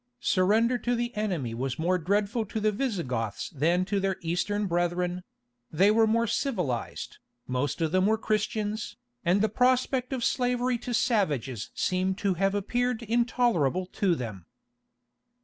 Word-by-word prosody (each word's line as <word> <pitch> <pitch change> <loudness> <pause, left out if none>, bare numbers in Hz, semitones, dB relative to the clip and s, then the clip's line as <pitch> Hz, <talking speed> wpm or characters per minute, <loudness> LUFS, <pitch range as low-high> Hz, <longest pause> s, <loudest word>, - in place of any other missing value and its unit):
Surrender 220 +6 +3
to 245 +2 0
the 240 0 -3
enemy 180 - -2
was 130 +2 -3
more 180 +3 +1
dreadful 205 +6 0
to 215 +1 -4
the 215 0 +2
Visigoths 165 - -2
than 170 +6 +1
to 200 +1 0
their 195 -1 0
eastern 195 +5 -1
brethren; 175 0 -1 0.5
they 190 +6 +4
were 225 +1 +4
more 230 +1 +2
civilized, 180 - -2 0.3
most 130 +6 -2
of 160 -2 +1
them 185 +2 +3
were 220 +1 +3
Christians, 215 0 -2 0.3
and 185 +3 +3
the - - +4
prospect 255 +2 +1
of 260 -3 -2
slavery 245 0 +1
to 245 - -6
savages 145 - 0
seems 185 +1 0
to 200 -2 +1
have 195 +3 +1
appeared 245 +3 -1
intolerable 230 - +1
to 185 -1 0
them. 105 - -6
200 Hz, 150 wpm, -28 LUFS, 175-230 Hz, 0.5 s, they